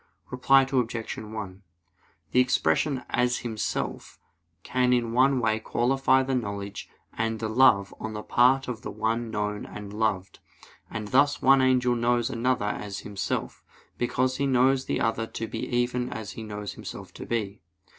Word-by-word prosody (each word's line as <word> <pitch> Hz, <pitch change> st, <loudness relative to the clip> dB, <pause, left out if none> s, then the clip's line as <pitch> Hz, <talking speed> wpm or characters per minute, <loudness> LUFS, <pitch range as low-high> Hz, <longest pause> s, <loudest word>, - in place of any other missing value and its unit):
Reply 135 Hz, +2 st, +5 dB
Obj. 120 Hz, -4 st, -2 dB
1: 105 Hz, -3 st, -7 dB, 0.7 s
The 125 Hz, -, +4 dB
expression 130 Hz, +1 st, +2 dB
'as 125 Hz, 0 st, +2 dB
himself' 110 Hz, -3 st, -3 dB, 0.5 s
can 125 Hz, 0 st, +2 dB
in 120 Hz, -2 st, 0 dB
one 130 Hz, +2 st, +4 dB
way 110 Hz, -2 st, +1 dB
qualify 130 Hz, +4 st, +2 dB
the 135 Hz, 0 st, -2 dB
knowledge 100 Hz, -4 st, -4 dB, 0.2 s
and 115 Hz, 0 st, -2 dB
the 110 Hz, -, -2 dB
love 110 Hz, -4 st, +4 dB
on 110 Hz, 0 st, -5 dB
the 105 Hz, 0 st, -5 dB
part 130 Hz, +2 st, +3 dB
of 120 Hz, -3 st, -5 dB
the -, -, -6 dB
one 110 Hz, +2 st, -1 dB
known 105 Hz, -1 st, -2 dB
and 105 Hz, -1 st, -8 dB
loved: 105 Hz, -4 st, -1 dB, 0.5 s
and 110 Hz, -1 st, -5 dB
thus 145 Hz, +4 st, +3 dB
one 135 Hz, 0 st, +6 dB
angel 125 Hz, -1 st, +3 dB
knows 120 Hz, +1 st, +1 dB
another 125 Hz, -2 st, 0 dB
as 105 Hz, -1 st, -4 dB
himself, 100 Hz, -3 st, -4 dB, 0.4 s
because 130 Hz, +1 st, 0 dB
he 140 Hz, -, 0 dB
knows 130 Hz, 0 st, +3 dB
the -, -, -1 dB
other 115 Hz, 0 st, 0 dB
to 115 Hz, -, -5 dB
be 110 Hz, -, -4 dB
even 125 Hz, 0 st, 0 dB
as 110 Hz, -2 st, -6 dB
he -, -, -8 dB
knows 105 Hz, -2 st, -6 dB
himself -, -, -9 dB
to -, -, -9 dB
be. 105 Hz, -4 st, -3 dB
120 Hz, 160 wpm, -26 LUFS, 105-130 Hz, 0.7 s, one